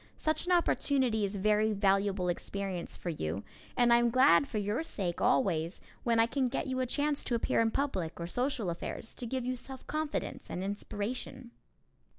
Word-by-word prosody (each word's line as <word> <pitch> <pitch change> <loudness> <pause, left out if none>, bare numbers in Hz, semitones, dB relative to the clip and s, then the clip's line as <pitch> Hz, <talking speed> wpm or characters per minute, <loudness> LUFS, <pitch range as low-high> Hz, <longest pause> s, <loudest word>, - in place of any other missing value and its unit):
Such 310 +3 -1
an - - +1
opportunity 265 - +2
is 200 +1 -4
very 215 +2 +2
valuable 195 -2 +2
experience 185 0 -3
for 175 - -4
you 100 - -3 0.3
and 240 -1 +5
I - - +7
am 240 0 +3
glad 265 +3 +5
for 225 - -4
your 210 +6 0
sake 190 - -3
always 185 -9 +2 0.2
when 230 -1 +2
I 225 - +6
can 255 +1 0
get 260 - -2
you 260 -1 -2
a 255 - 0
chance 290 +3 0
to 240 - +1
appear 230 - +2
in 225 - +3
public 195 - -2
or 170 - -3
social 245 0 -1
affairs, 170 +6 -6
to 245 - -6
give 255 +1 -2
you 255 0 -1
self 260 +1 -10
confidence 310 -1 -3
and 180 - -3
inspiration. 220 +5 -4
230 Hz, 185 wpm, -31 LUFS, 195-260 Hz, 0.3 s, I